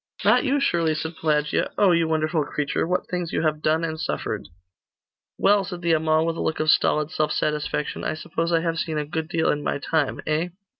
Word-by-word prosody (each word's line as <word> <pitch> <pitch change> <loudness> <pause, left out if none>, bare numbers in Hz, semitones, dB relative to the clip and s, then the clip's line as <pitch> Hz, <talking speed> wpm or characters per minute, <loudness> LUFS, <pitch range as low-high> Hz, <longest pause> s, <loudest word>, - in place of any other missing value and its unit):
'Not - - +5
you, 285 +1 +1
surely,' 165 - +1
said 160 +1 -4
Pelagia. 150 -2 +1
'Oh, 200 -3 +5
you 170 -1 +3
wonderful 155 0 +1
creature! 145 +2 -2
what 180 +1 0
things 180 -2 -3
you - - -1
have 155 -1 0
done 160 +2 +1
and 160 -1 -3
suffered!' - - -3 0.9
'Well,' 200 0 +4
said 180 -2 -7
the 170 -1 +3
Amal, 155 0 +2
with 165 0 -1
a - - -3
look 160 - -1
of 155 0 +4
stolid 150 0 +2
self 155 0 0
satisfaction, 150 0 -2
'I - - -1
suppose 165 +1 -3
I 165 -1 +3
have 165 -1 -1
seen 160 -2 -2
a 150 - -1
good 155 +1 -3
deal 165 -1 +1
in 150 - -2
my - - -1
time, 145 -1 -1
eh? 155 +3 0
160 Hz, 215 wpm, -24 LUFS, 155-170 Hz, 0.9 s, Not